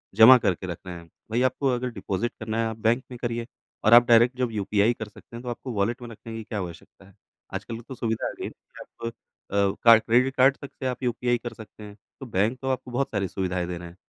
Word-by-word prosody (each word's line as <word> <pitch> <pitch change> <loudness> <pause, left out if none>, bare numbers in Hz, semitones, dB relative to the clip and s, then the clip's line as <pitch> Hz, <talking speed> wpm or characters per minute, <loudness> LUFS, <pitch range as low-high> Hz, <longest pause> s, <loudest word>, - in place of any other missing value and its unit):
जमा 115 +4 +10
करके 95 -4 -1
रख 85 - -4
रहे 90 -1 -6
हैं। 85 -1 -12 0.2
वहीं 120 +3 +2
आपको 135 +2 +1
अगर 125 +1 -2
डिपॉजिट 100 +2 -3
करना 110 0 -3
है - - +1
आप 110 - -5
बैंक 115 +3 +1
में 125 - -7
करिए 120 -1 -2 0.4
और 110 - +6
आप 120 0 +9
डायरेक्ट 120 +2 +5
जब 125 -2 0
यूपीआई 105 +2 +2
कर 110 -2 -7
सकते 115 - -15
हैं 120 - -7
तो 125 - -5
आपको 120 +1 -5
वॉलेट 110 +5 -1
में 120 - -8
रखने 115 0 -9
की 110 - -5
क्या 105 -1 -4
आवश्यकता 90 +2 -9
हैं। 100 - -20 0.4
आजकल 115 0 -5
तो 130 +2 -9
सुविधा 115 -2 -2
आ - - -3
गई - - -4
है - - -5 0.3
आप 115 - -7 0.4
अ, 100 - -3 0.3
का 115 -1 +9
क्रेडिट 125 +4 +2
कार्ड 135 +1 +5
तक 140 - -7
से 130 - -8
आप 125 +1 -4
यूपीआई 120 0 +1
कर 120 0 -7
सकते 110 0 -12
हैं 105 -1 -10 0.2
तो 135 - -7
बैंक 110 +2 0
तो 135 - -4
आपको 130 -1 -3
बहुत 135 +3 0
सारी 100 -1 -1
सुविधाएँ 90 -1 -2
दे 90 - -4
रहे 85 0 -8
है 85 - -13
115 Hz, 255 wpm, -25 LUFS, 100-125 Hz, 0.4 s, जमा